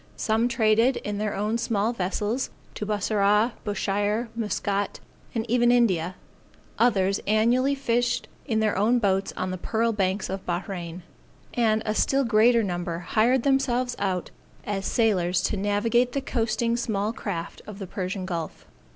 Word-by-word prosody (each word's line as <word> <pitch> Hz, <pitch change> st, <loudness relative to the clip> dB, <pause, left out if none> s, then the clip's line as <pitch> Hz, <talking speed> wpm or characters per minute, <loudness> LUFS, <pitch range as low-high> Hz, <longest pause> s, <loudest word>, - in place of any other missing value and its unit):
Some 225 Hz, +1 st, +1 dB
traded 230 Hz, +1 st, +3 dB
in 205 Hz, -1 st, -4 dB
their 210 Hz, -1 st, -1 dB
own 215 Hz, +3 st, -1 dB
small 225 Hz, 0 st, 0 dB
vessels 210 Hz, +5 st, -2 dB, 0.2 s
to 210 Hz, -, -5 dB
Bussorah, 210 Hz, +2 st, +2 dB
Bushire, 205 Hz, +2 st, -1 dB
Muscat, 205 Hz, -2 st, -2 dB, 0.4 s
and 225 Hz, 0 st, -1 dB
even 240 Hz, 0 st, +3 dB
India; 185 Hz, -8 st, +2 dB, 0.6 s
others 200 Hz, -5 st, +3 dB
annually 240 Hz, +6 st, +3 dB
fished 245 Hz, -2 st, 0 dB, 0.2 s
in 220 Hz, -4 st, +1 dB
their 215 Hz, -1 st, +1 dB
own 220 Hz, +5 st, +3 dB
boats 195 Hz, -4 st, +1 dB
on 185 Hz, -, -2 dB
the 185 Hz, -, -4 dB
pearl 230 Hz, +4 st, 0 dB
banks 195 Hz, -1 st, 0 dB
of 190 Hz, 0 st, -5 dB
Bahrain; 175 Hz, -1 st, -4 dB, 0.5 s
and 220 Hz, -2 st, +2 dB
a 215 Hz, -, 0 dB
still 275 Hz, +5 st, +2 dB
greater 230 Hz, 0 st, +4 dB
number 175 Hz, -3 st, -3 dB
hired 230 Hz, +8 st, +2 dB
themselves 255 Hz, -3 st, +1 dB
out 185 Hz, -3 st, -2 dB, 0.3 s
as 195 Hz, -2 st, -2 dB
sailors 185 Hz, -6 st, +2 dB
to 210 Hz, -, 0 dB
navigate 225 Hz, +5 st, +1 dB
the 275 Hz, -, -1 dB
coasting 235 Hz, -2 st, 0 dB
small 215 Hz, -2 st, -1 dB
craft 175 Hz, -7 st, -5 dB
of 210 Hz, -2 st, -8 dB
the 200 Hz, -, -6 dB
Persian 185 Hz, 0 st, -4 dB
Gulf. 170 Hz, -4 st, -5 dB
215 Hz, 150 wpm, -25 LUFS, 195-235 Hz, 0.6 s, greater